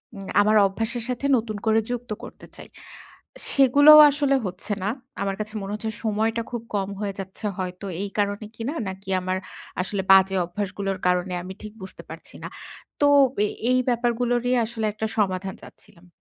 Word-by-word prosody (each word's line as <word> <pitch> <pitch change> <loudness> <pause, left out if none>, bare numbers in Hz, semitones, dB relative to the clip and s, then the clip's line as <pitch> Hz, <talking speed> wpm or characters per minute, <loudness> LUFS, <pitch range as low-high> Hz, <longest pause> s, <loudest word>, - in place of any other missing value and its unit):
উম 195 -1 -8
আমার 215 +1 +4
অভ্যাসের 225 +4 -3
সাথে 250 +2 -3
নতুন 220 -2 -4
করে 220 0 +4
যুক্ত 245 -2 -5
করতে - - -11
চাই। - - -11 0.8
সেগুলোও 285 +3 +8
আসলে 280 -1 +1
হচ্ছে 185 +3 -4
না। 200 - 0 0.3
আমার 195 -1 -1
কাছে 215 +1 -5
মনে 195 +1 -5
হচ্ছে 220 +1 -4
সময়টা 220 +2 0
খুব 240 - -3
কম 195 -1 -1
হয়ে 200 -1 -2
যাচ্ছে 195 +3 -7
হয়তো 185 +1 -5 0.2
এই 200 - -4
কারণে 205 +1 -1
কিনা? 235 +7 -4 0.2
নাকি 190 +1 -9
আমার 185 +1 -1 0.4
আসলে 195 +1 -2
বাজে 195 0 +6
অভ্যাসগুলোর 195 +1 -4
কারণে? 180 0 +1
আমি 190 +1 -7
ঠিক 215 0 -8
বুঝতে 190 - -10
পারছি - - -11
না। - - -4 0.5
তো 290 - +6 0.4
এ - - 0 0.2
এই 255 - +4
ব্যাপারগুলো 240 0 0
নিয়ে 250 0 +2
আসলে 225 -1 -4
একটা 215 +1 -3
সমাধান 190 -2 0
চাচ্ছিলাম। 175 +1 -17
210 Hz, 170 wpm, -24 LUFS, 195-235 Hz, 0.8 s, সেগুলোও